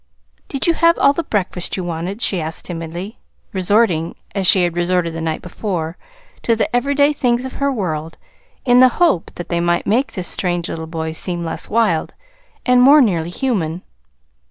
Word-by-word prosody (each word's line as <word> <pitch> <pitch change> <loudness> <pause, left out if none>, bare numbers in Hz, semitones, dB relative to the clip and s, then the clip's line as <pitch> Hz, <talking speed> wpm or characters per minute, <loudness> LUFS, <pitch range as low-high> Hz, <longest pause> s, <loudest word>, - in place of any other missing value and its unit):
"Did 275 - -2
you 335 - +4
have 335 +1 +3
all 280 - +4
the 335 - -1
breakfast 190 - -2
you 185 - -3
wanted?" 175 +6 -4
she 185 -4 0
asked 160 +1 -4
timidly, 175 +4 -6 0.3
resorting, 185 -3 +1 0.2
as 195 -3 0
she 185 0 +5
had 175 -1 -1
resorted 175 -1 0
the 165 - -5
night 160 -1 -3
before, 175 -3 -4 0.5
to 230 - +2
the 225 - -1
everyday 285 +3 +3
things 245 -2 0
of 260 - -6
her 280 0 +2
world 165 - -3 0.5
in 245 -1 +5
the 255 0 +8
hope 335 - +2
that 175 - -7
they 170 - 0
might 175 0 +1
make 250 +6 +1
this 185 -3 -4
strange 175 -2 -1
little 160 0 -5
boy 160 -1 -4
seem 175 +1 -3
less 165 - -5
wild, 210 -8 +1 0.5
and 250 -1 +5
more 280 +4 +8
nearly 175 - +2
human. 180 - -2
185 Hz, 180 wpm, -18 LUFS, 170-245 Hz, 0.5 s, the